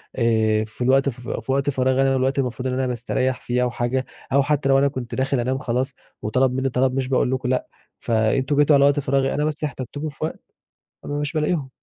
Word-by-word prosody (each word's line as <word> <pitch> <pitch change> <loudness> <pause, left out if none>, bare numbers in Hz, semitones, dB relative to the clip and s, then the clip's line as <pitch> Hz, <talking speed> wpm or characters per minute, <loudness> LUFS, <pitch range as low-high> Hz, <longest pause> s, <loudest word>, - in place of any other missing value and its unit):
آآ 110 -3 +2
في 110 +3 -6
الوقت 135 +2 +3
فف 125 -1 -8
في 115 +4 -3
وقت 140 +1 +1
فراغي 130 0 +1
أنا 135 0 +3
والوقت 130 +1 +1
اللي 130 - +2
مفروض 125 +2 -5
إن 125 - -1
أنا 130 0 0
باستريّح 125 +2 -1
فيه 125 +1 0
أو 125 - 0
حاجة 120 +2 -1 0.3
أو 140 0 +5
حتى 145 -1 0
لو 135 - +5
أنا 140 - +4
كنت 130 -3 -5
داخل 135 0 0
انام 130 +2 0
خلاص 130 0 -2 0.3
وطلب 125 +4 +1
منّي 130 +1 0
طلب 130 +1 +1
مش 130 -1 -1
باقول 130 -1 +1
لكم 130 -1 -1
لأ، 130 - 0 0.3
فأنتم 120 +5 +1
جيتوا 145 0 +5
على 140 0 +5
وقت 145 0 +3
فراغي 135 0 +1
أنا، 150 - 0
بس 155 0 -3
احتجتكوا 145 +2 -4
في 140 - -15
وقت 160 - -3 0.7
أنا 145 - -4
مش 145 -1 -3
بالاقيهم. 150 -3 0
130 Hz, 230 wpm, -22 LUFS, 125-140 Hz, 0.7 s, أو